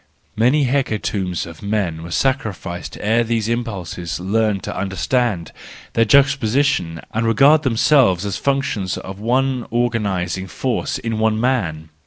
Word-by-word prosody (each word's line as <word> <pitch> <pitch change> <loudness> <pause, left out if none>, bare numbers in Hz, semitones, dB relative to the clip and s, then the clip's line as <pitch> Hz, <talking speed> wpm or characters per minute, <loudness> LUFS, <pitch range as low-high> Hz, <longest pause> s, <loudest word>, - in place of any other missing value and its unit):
Many 125 +7 +3
hecatombs 105 -8 -1
of 85 -2 -11
men 100 -6 -1
were 85 - -8
sacrificed 100 -7 -2
ere 110 +3 +2
these 115 -2 -1
impulses 95 -8 -3
learned 105 +1 0
to - - -5
understand 95 - -1 0.4
their 115 - +3
juxtaposition 135 - +2
and 115 +1 0
regard 140 +7 +5
themselves 115 - +3
as 100 -2 -2
functions 135 -9 -1
of 95 +1 -8
one 125 +2 0
organising 100 -6 -1
force 125 +5 -2
in 115 -1 -3
one 110 0 +2
man 90 -12 -1
110 Hz, 130 wpm, -20 LUFS, 95-125 Hz, 0.4 s, regard